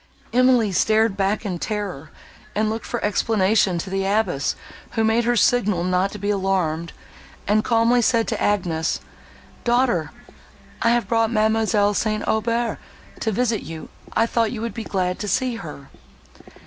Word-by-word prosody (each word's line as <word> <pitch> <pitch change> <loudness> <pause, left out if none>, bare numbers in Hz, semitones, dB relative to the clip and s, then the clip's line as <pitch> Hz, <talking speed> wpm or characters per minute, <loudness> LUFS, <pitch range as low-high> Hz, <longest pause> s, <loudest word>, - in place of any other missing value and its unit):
Emily 250 -4 +4
started 215 +3 +2
back 200 +2 0
in 180 -4 -3
terror, 195 -9 -4 0.5
and 215 +1 +1
looked 225 +1 -5
for 240 - -2
explanation 210 -3 +2
to 190 +3 -5
the 195 0 0
abbess, 195 -7 0 0.4
who 225 - +1
made 225 +2 +2
her 240 - +3
a - - 0
signal 210 -8 +2
not 185 +2 +1
to - - -7
be 205 +1 -1
alarmed, 185 -5 -1 0.6
and 215 +1 +3
calmly 235 +1 +3
said 230 -1 +2
to 220 - -3
Agnes, 170 -6 0 0.6
"Daughter, 240 - +1 0.7
I 230 - +3
have 240 0 +1
brought 225 -1 +2
Mademoiselle 215 -2 +2
St. 215 0 -1
Aubert 230 +2 0 0.4
to 220 - -1
visit 230 0 0
you: 160 -1 -8 0.2
I 225 - +3
thought 230 -1 0
you 225 - -5
would 230 0 -3
be 230 - -5
glad 185 -3 -2
to 210 - -4
see 245 +4 0
her." 150 -8 -9
215 Hz, 160 wpm, -22 LUFS, 190-230 Hz, 0.7 s, Emily